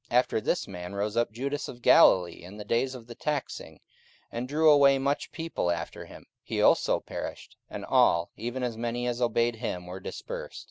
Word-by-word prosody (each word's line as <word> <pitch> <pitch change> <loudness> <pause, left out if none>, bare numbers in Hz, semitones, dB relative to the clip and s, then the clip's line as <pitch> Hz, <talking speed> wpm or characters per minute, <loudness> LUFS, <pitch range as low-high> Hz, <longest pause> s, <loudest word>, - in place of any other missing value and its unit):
44:005:037 120 - +3
After 125 -3 +2
this 170 +9 -1
man 90 0 -7
rose 105 +2 -2
up 120 0 +1
Judas 140 +6 -3
of 120 - -10
Galilee 90 -2 +5
in 95 +4 -11
the 105 - -8
days 125 +5 0
of 120 -3 -10
the 120 - -9
taxing, 145 +3 -4 0.5
and 120 +2 -4
drew 155 +3 +4
away 140 -2 +6
much 140 +2 -1
people 165 - -3
after 85 -1 -4
him: - - -13 0.2
he - - -4
also - - +4
perished; - - -7
and - - -6
all, 85 0 +3
even 120 +3 -4
as 120 -2 -2
many 120 +1 -3
as 120 0 -2
obeyed 120 -1 +1
him, 90 -6 -4
were 90 +1 -7
dispersed. - - -7
120 Hz, 195 wpm, -28 LUFS, 105-135 Hz, 0.5 s, away